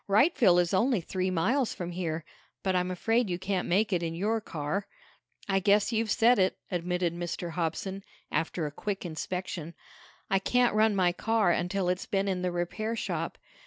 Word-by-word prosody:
"Wrightville 210 - +5
is 175 0 +1
only 230 +4 +3
three 185 +2 -2
miles 225 +9 +1
from 175 -1 -5
here. 165 -2 -3 0.4
But 190 -1 +1
I'm 180 0 +1
afraid 225 +5 +1
you 175 - -1
can't 185 0 -2
make 205 +3 +2
it 175 - +1
in 165 -1 -3
your 215 +5 0
car." 160 +5 -3 0.6
"I 195 -1 +2
guess 205 +3 +3
you've 225 -1 0
said 230 +2 +4
it," 185 0 +2
admitted 180 -1 0
Mr. 175 0 -4
Hobson, 180 +4 -3 0.3
after 165 0 -1
a 150 - -3
quick 195 +5 -4
inspection. 170 0 -4 0.5
"I 195 - +2
can't 245 +4 +2
run 215 0 +3
my 180 -2 +3
car 220 +1 +2
until 180 +2 0
it's 180 +1 -1
been 195 0 0
in 185 -2 -1
the 180 0 0
repair 195 +6 -2
shop. - - -3
185 Hz, 180 wpm, -29 LUFS, 175-210 Hz, 0.6 s, Wrightville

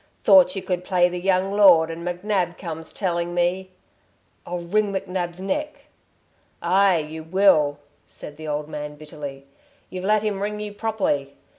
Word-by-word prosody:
"Thought 275 -1 +6
you 195 - -4
could 180 -1 -2
play 180 -1 +2
the 180 0 -4
young 190 +1 +1
lord... 180 -6 +6
and 165 +1 -7
McNab 180 0 -1
comes 160 -2 -6
telling 175 -2 -2
me 180 +2 0 0.4
" - - -41
"I'll 175 0 -4
wring 205 +4 0
McNab's 185 -2 -3
neck!" 295 +11 -4 0.7
"Aye, 195 -1 +3
you 155 0 -5
will," 160 -5 +3 0.3
said 150 - -10
the 155 +1 -9
old 150 0 -3
man, 150 -1 -6
bitterly. 145 -2 -9 0.5
"You've 185 0 -6
let 215 +1 +2
him 205 -2 -2
wring 210 +1 -3
you 210 -1 -5
properly. 205 -11 -2
180 Hz, 160 wpm, -23 LUFS, 160-195 Hz, 0.7 s, Thought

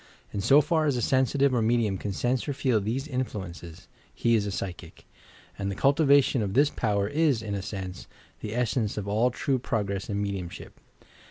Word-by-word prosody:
In 100 - -2
so 140 +9 +6
far 160 -1 +1
as 140 -4 +1
a - - -1
sensitive 135 +2 +2
or 120 - +2
medium 110 -3 +1
can 105 - -3
sense 125 - -1
or - - 0
feel 125 -5 +1
these 125 +8 -2
influ 125 -8 -3
ences, 85 -1 -11 0.3
he 115 - +1
is 105 -3 +2
a - - -2
psychic; 95 -2 -7 0.5
and 100 0 -2
the 100 - -3
cultivation 140 - +4
of 100 -1 -2
this 145 +2 +4
power 100 -3 0
is, 145 -3 +1
in 105 -2 -4
a 100 - -2
sense, 95 -2 -6 0.3
the 110 +1 -5
essence 115 -3 0
of 100 -1 -3
all 110 +5 +2
true 130 +2 -1
progress 100 -5 -2
in 100 -1 -1
medium 100 -4 -3
ship. - - -11
110 Hz, 200 wpm, -27 LUFS, 100-130 Hz, 0.5 s, so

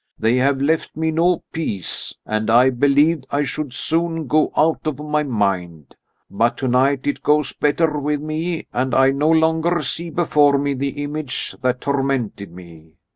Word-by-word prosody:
They 115 +3 +1
have 135 +1 +2
left 155 +4 -1
me 160 0 0
no 170 +2 +1
peace, 110 - -3
and 110 0 -2
I 125 +3 +5
believed 145 +3 +2
I 145 +1 0
should 145 0 -4
soon 165 +3 0
go 155 +3 +1
out 155 +1 +1
of 150 -4 -2
my 150 0 -1
mind. 95 - -2 0.3
But 115 +4 0
tonight 130 +2 +1
it 145 - -2
goes 150 -1 +1
better 150 +1 0
with 145 +1 -1
me 160 +3 -3
and 130 0 -1
I 135 0 +5
no 145 +3 0
longer 160 +1 +2
see 170 +5 -2
before 150 -3 +3
me 140 0 -1
the 140 +2 -3
image 145 -2 -4
that 125 0 -1
tormented 135 -8 -2
me. 85 -3 -14
145 Hz, 165 wpm, -20 LUFS, 125-155 Hz, 0.3 s, I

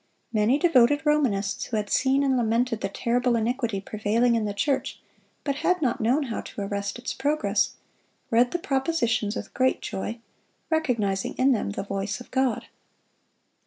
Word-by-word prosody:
Many 220 +5 +3
devoted 290 -2 +4
Romanists, 245 -10 +1
who 225 - -2
had 210 -1 -3
seen 270 +1 +3
and 270 -1 +2
lamented 230 -1 +1
the 195 - -1
terrible 240 +4 +1
iniquity 230 -2 -1
prevailing 215 +4 +1
in 225 -2 +1
the 205 - -1
church, 275 +6 -1 0.4
but 280 -1 -1
had 360 +4 +1
not 255 -7 0
known 255 +7 +2
how 235 -5 -4
to - - -8
arrest 200 +1 -3
its 245 - -4
progress, 295 +3 0 0.6
read 240 +2 +4
the 350 - -1
propositions 265 -8 0
with - - -6
great 260 0 +2
joy, 215 +4 -4 0.5
recognizing 230 -12 0
in 265 +2 +3
them 220 - 0
the 100 - -4
voice 195 +2 -3
of 245 - -13
God. 260 -4 0
240 Hz, 160 wpm, -26 LUFS, 210-270 Hz, 0.6 s, devoted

